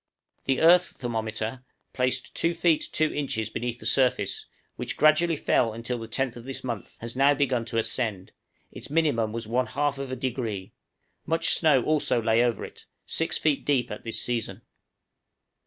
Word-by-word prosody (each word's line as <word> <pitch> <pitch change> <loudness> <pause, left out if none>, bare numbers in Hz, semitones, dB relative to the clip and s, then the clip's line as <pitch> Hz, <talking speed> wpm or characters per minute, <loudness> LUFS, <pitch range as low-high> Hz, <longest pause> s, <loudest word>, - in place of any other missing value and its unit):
The 135 -1 +1
earth 175 +2 +6
thermometer 110 0 -3 0.3
placed 130 0 -1
2 170 +1 0
feet 165 -2 +2
2 155 0 +1
inches 120 -7 -2
beneath 120 +1 -3
the - - -11
surface 130 -2 +1 0.3
which - - -5
gradually 155 +2 +4
fell 115 -5 +1
until 120 +2 -4
the 115 - -7
10th 130 +2 -2
of 120 0 -10
this 135 0 -6
month, 120 -5 -5
has 115 +1 -5
now 140 +2 +4
begun 130 -4 0
to 115 0 -4
ascend; 110 -4 -1 0.4
its - - -8
minimum 140 -8 +1
was 115 0 -4
+1/2°; 130 -3 -2 0.6
much 165 +1 +2
snow 150 -6 +4
also 150 -5 +2
lay 115 +1 +3
over 120 -2 0
it, - - -13 0.2
6 165 - 0
feet 150 -3 +1
deep 130 -4 +1
at - - -6
this 115 - -2
season. 120 -2 -3
125 Hz, 155 wpm, -26 LUFS, 115-145 Hz, 0.6 s, earth